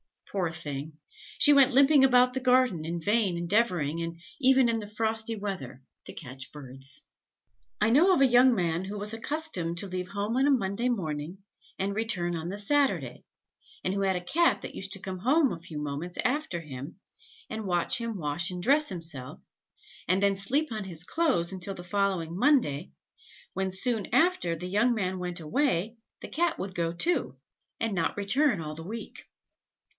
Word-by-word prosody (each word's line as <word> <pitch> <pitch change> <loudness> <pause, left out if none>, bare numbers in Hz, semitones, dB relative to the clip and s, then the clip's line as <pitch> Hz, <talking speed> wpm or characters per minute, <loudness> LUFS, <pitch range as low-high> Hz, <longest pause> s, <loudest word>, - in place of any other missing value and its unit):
Poor 185 -4 0
thing! 155 -2 -6 0.4
she 290 - +7
went 275 -2 +5
limping 275 +1 +6
about 250 -1 +4
the 260 - -1
garden, 250 -10 +2
in 170 +1 -3
vain 205 -1 +1
endeavouring, 170 -4 0 0.2
even 265 -2 +5
in 230 -1 0
the 210 - -7
frosty 220 +1 0
weather, 190 - -6 0.2
to - - -7
catch 130 -3 -8
birds." 135 -1 -2 0.8
I 215 - +4
know 325 +11 +5
of 315 - +2
a - - +7
young 250 0 +5
man 175 -2 -1
who 205 +2 -5
was 210 +2 -4
accustomed 225 - -3
to 200 - -3
leave 185 -1 -4
home 205 +5 -2
on 270 +2 +3
a - - +4
Monday 230 -1 0
morning 165 -6 -3 0.4
and 195 +1 -1
return 200 -5 -1
on 165 0 -4
the 195 +3 -4
Saturday, 280 +7 0 0.6
and 185 - 0
who 200 - -1
had 190 -1 +1
a 180 - -2
Cat 340 - +2
that - - -7
used 195 0 -5
to 195 - -7
come 190 -1 -5
home 275 - +3
a 170 - -5
few 165 -2 -7
moments 150 +4 -5
after 250 - -1
him, 140 +1 -8 0.5
and 220 -1 -5
watch 175 -2 +1
him 230 -2 -4
wash 160 +2 -1
and 180 -1 -6
dress 295 +5 +4
himself, 160 -8 -1 0.7
and 185 +3 +2
then 200 -1 +3
sleep 275 +10 0
on 215 -3 -4
his 170 -3 -4
clothes 255 - 0
until 190 +1 -5
the 175 - -8
following 180 -3 -1
Monday, 200 - +2 0.6
when 190 0 -1
soon 210 +2 -1
after 270 - +2
the 170 +2 -7
young 220 +6 +2
man 185 -3 -2
went 180 -1 -3
away, 220 - 0 0.2
the - - -8
Cat 340 +1 0
would 190 0 -5
go 170 -2 -1
too, 335 - 0 0.4
and 225 -2 -1
not 170 0 -1
return 225 - +2
all 155 -1 -5
the 160 +2 -8
week. 225 +3 -7
195 Hz, 180 wpm, -28 LUFS, 170-245 Hz, 0.8 s, she